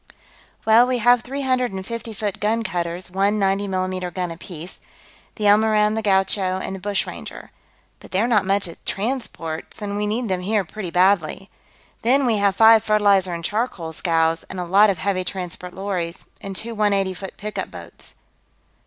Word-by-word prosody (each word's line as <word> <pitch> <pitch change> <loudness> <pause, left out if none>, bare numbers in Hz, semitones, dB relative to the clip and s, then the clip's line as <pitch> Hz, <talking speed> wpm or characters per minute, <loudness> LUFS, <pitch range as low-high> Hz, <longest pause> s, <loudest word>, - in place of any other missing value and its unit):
"Well, 225 +3 +6
we 255 -1 +1
have 245 +1 +4
three 275 +3 -5
hundred 255 -2 +1
and 190 -1 -6
fifty 230 +1 -5
foot 205 -2 -3
gun 225 +2 +1
cutters, 175 -2 -3
one 200 +3 +1
90 195 0 +1
mm 185 -2 -2
gun 180 -2 -2
apiece. 170 +1 -9 0.6
The 215 - -6
Elmoran, 210 0 +4
the 220 - -1
Gaucho, 190 -2 +1
and 190 0 -4
the - - -7
Bushranger. 200 +1 -4 0.5
But - - -14
they're 200 +5 +1
not 215 -5 +3
much 195 0 +1
as 170 - -11
transports, 200 -8 -4
and 205 -1 -4
we 210 0 -1
need 230 +3 -1
them 185 -2 -1
here 205 +1 0
pretty 195 0 -6
badly. 185 +1 +2 0.5
Then, 265 +4 +3
we 230 -3 +2
have 200 -1 +2
five 225 -1 +7
fertilizer 200 -4 +3
and 170 -1 -6
charcoal 205 -7 -2
scows, 165 0 +1
and 190 - -6
a 180 - -2
lot 200 +4 +5
of 195 - 0
heavy 185 +1 -1
transport 180 -1 -6
lorries, 185 -3 -3 0.2
and 195 -1 -6
two 230 +4 -3
one 210 -2 +2
eighty 195 -1 0
foot 190 +1 -8
pickup 210 0 -4
boats." - - -13
200 Hz, 180 wpm, -22 LUFS, 185-215 Hz, 0.6 s, five